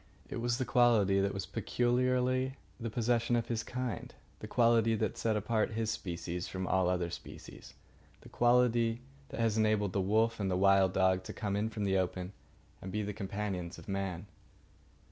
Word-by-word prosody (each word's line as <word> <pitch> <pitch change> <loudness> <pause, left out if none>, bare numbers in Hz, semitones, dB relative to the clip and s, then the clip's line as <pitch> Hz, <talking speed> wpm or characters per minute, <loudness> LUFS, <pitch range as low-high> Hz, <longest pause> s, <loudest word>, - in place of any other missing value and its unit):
It - - -3
was 120 0 0
the 130 - -1
quality 115 -6 +4
that 100 0 +1
was 100 -1 -4
peculiarly 125 +1 0 0.2
the 115 -1 -3
possession 120 +1 +1
of 115 0 -1
his 115 -2 -1
kind; 120 -3 -4 0.3
the - - -7
quality 115 -2 +3
that 110 -2 -1
set 110 -2 0
apart 110 +1 0
his 110 0 -1
species 85 -2 -4
from 95 0 -4
all 95 -1 +2
other 90 -2 -1
species; - - -10 0.5
the - - -14
quality 120 -1 +3 0.3
that - - -7
has 110 -1 +1
enabled 105 -3 +2
the 100 - +1
wolf 110 +4 +1
and 100 -2 -1
the 90 - 0
wild 95 -1 +4
dog 95 -1 +3
to - - -6
come 100 -2 -2
in 105 +2 0
from 110 -2 -4
the 95 -1 +2
open 90 +1 -3 0.5
and 95 - -6
be 105 +2 -1
the 105 +1 -4
companions 95 -3 -4
of - - -13
man. 95 -2 -3
110 Hz, 185 wpm, -32 LUFS, 95-115 Hz, 0.5 s, quality